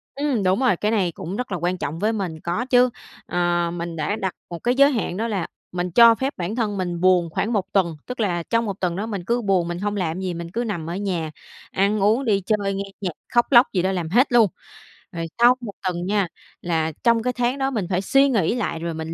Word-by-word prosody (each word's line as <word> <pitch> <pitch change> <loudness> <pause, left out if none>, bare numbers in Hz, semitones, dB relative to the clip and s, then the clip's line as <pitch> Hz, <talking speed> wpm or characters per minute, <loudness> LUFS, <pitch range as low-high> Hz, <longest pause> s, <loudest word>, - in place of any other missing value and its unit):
Ừm, 275 -6 0
đúng 185 +4 +2
rồi, 255 -7 +3
cái 210 +4 0
này 190 -6 +1
cũng 175 +4 -6
rất 250 -4 -4
là 180 - -1
quan 175 +2 -1
trọng 160 0 -4
với 215 +2 +1
mình, 185 -7 -3
có 175 +9 -2
chứ. 250 -1 +4 0.4
Ờ, 175 -1 0
mình 170 -1 -5
đã 155 +6 -1
đặt 190 -4 -3 0.2
một 170 -1 -6
cái 245 +1 +1
giới 280 +2 +6
hạn 215 -8 -2
đó 225 +2 -1
là 195 -7 -2 0.2
mình 180 0 -3
cho 230 +4 +7
phép 265 +4 -2
bản 180 +4 -3
thân 215 -4 -1
mình 175 -2 -3
buồn 180 -2 +4
khoảng 220 +8 -1
1 200 -3 +1
tuần, 170 -5 +2
tức 250 0 -7
là 175 -6 0
trong 230 +5 0
1 200 -2 -4
tuần 175 -2 -1
đó 205 - -3
mình 200 -5 -4
cứ 235 +4 0
buồn, 190 -5 +1
mình 175 0 -4
hông 205 +1 -2
làm 175 -2 -2
gì, 185 -2 -2
mình 170 0 -6
cứ 235 +5 -1
nằm 175 -8 -4
ở 175 - -3
nhà 180 -6 -2 0.4
ăn 200 +2 +1
uống, 220 +7 +2
đi 200 -4 +2
chơi, 205 -2 0
nghe 195 +1 -2 0.2
nhạc, 185 - -1 0.2
khóc 240 0 +4
lóc 240 0 +7
gì 180 - +2
đó 190 +2 +1
làm 175 -4 -2
hết 250 - +3
luôn, 235 -3 +6 0.6
rồi 165 -2 -4
sau 240 +1 +7
1 215 -4 -6
tuần 180 -1 -2
nha, 200 -1 +1 0.3
là 160 -2 0
trong 230 -2 +3
cái 250 0 0
tháng 245 +2 0
đó 270 0 0
mình 210 -7 -1
phải 185 -1 0
suy 275 +7 +4
nghĩ 220 -5 +1
lại 205 -9 -2
rồi 170 0 -3
mình 160 +1 -5
195 Hz, 255 wpm, -22 LUFS, 175-230 Hz, 0.6 s, cho